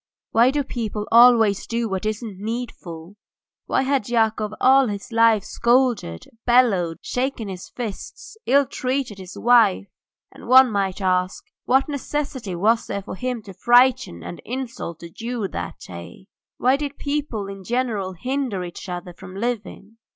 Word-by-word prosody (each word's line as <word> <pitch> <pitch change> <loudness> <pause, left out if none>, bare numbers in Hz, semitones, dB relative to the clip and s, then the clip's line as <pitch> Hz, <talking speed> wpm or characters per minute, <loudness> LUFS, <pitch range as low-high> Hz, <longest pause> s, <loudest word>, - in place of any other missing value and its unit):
Why 235 +3 +5
do 285 +1 0
people 220 -5 -4
always 230 -4 +6
do 230 0 -1
what 190 0 -2
isn't 215 -2 -5
needful? 205 -6 -6 0.5
Why - - +1
had 265 -5 0
Yakov 220 -2 +1
all 265 0 +5
his 205 +1 -6
life 230 -3 +4
scolded, 235 - +1 0.2
bellowed, 210 -10 +3
shaken 250 -4 -2
his 185 -2 -8
fists, 235 - -7
ill 280 +2 +5
treated 255 -5 -3
his 185 0 -10
wife, 230 -5 +4 0.5
and, - - -13
one 255 0 +7
might 195 -1 -1
ask, 185 0 0 0.2
what 265 +2 +3
necessity 280 - -4
was 220 +6 +2
there 200 - -4
for - - -7
him 250 +2 -4
to 195 - -10
frighten 240 - +3
and 85 0 -8
insult 235 -9 -6
the 170 - -9
Jew 230 +1 -4
that 90 -1 -5
day? 85 - -10 0.3
Why 260 +2 +3
did 285 -1 -5
people 285 -8 -3
in 195 -1 -8
general 225 -4 -1
hinder 250 0 -2
each 175 +2 -8
other 180 0 -6
from 185 +2 -12
living? 220 -1 -4
225 Hz, 150 wpm, -22 LUFS, 190-250 Hz, 0.5 s, one